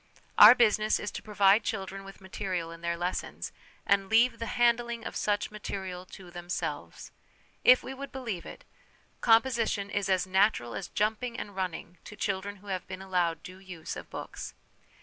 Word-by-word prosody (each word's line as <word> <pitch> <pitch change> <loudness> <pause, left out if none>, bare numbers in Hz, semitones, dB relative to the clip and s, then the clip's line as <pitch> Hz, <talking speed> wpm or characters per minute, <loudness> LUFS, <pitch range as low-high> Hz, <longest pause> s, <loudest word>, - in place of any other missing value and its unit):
Our 215 +4 +11
business 215 -3 +3
is 205 - -4
to - - -6
provide 205 0 +4
children 195 -2 -4
with 195 0 -12
material 185 -3 -4
in 165 0 -11
their 170 0 -1
lessons, 175 +1 -3 0.3
and, 195 -1 +2
leave 235 +3 +4
the 230 - -3
handling 235 -1 +2
of - - -5
such 205 0 0
material 190 -3 -6
to 180 -2 -12
themselves. 175 +1 -5 0.5
If 255 - +7
we 265 - -6
would 275 +1 -8
believe 230 -10 -4
it, - - -11 0.5
composition 225 -4 +2
is 200 -1 -1
as 185 -1 +2
natural 185 - +2
as 195 - -5
jumping 220 +3 -1
and 205 - -6
running 180 -2 -4
to 210 - -9
children 200 0 -2
who 205 +1 -18
have 185 -1 -5
been 185 0 -7
allowed 175 -4 0
due 185 +1 -10
use 180 -4 -7
of - - -9
books. - - -7
195 Hz, 170 wpm, -29 LUFS, 185-220 Hz, 0.5 s, Our